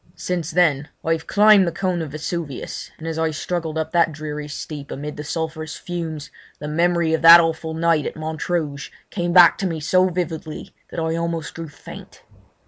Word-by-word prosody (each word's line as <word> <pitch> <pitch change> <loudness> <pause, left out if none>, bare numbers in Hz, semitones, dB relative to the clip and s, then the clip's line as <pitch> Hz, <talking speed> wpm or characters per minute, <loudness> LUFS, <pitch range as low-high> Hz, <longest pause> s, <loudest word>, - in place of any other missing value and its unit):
Since 175 -3 -3
then 155 -5 +2 0.2
I 165 - +1
have 160 0 -5
climbed 210 -2 +6
the - - 0
cone 185 -2 -1
of 160 - -4
Vesuvius, 155 -1 -5
and 165 - -8
as 160 0 -3
I 160 0 +1
struggled 160 +1 -3
up 160 0 -2
that 170 -2 +3
dreary 150 -1 -6
steep 145 -1 -7
amid 150 +2 -6
the 150 - -6
sulphurous 160 0 -4
fumes 165 -5 -6 0.3
the 150 - -7
memory 170 +1 +1
of 160 - +1
that 165 +1 +11
awful 160 -1 -1
night 165 -2 +2
at - - -6
Montrouge 155 -2 -3 0.2
came 175 -3 -2
back 175 -1 +7
to 195 - 0
me 165 -3 -3
so 185 +4 +3
vividly 165 -3 -5 0.2
that - - -5
I 160 0 -1
almost 170 -2 -3
grew 165 -2 -7
faint. 145 - -12
160 Hz, 190 wpm, -21 LUFS, 155-170 Hz, 0.3 s, that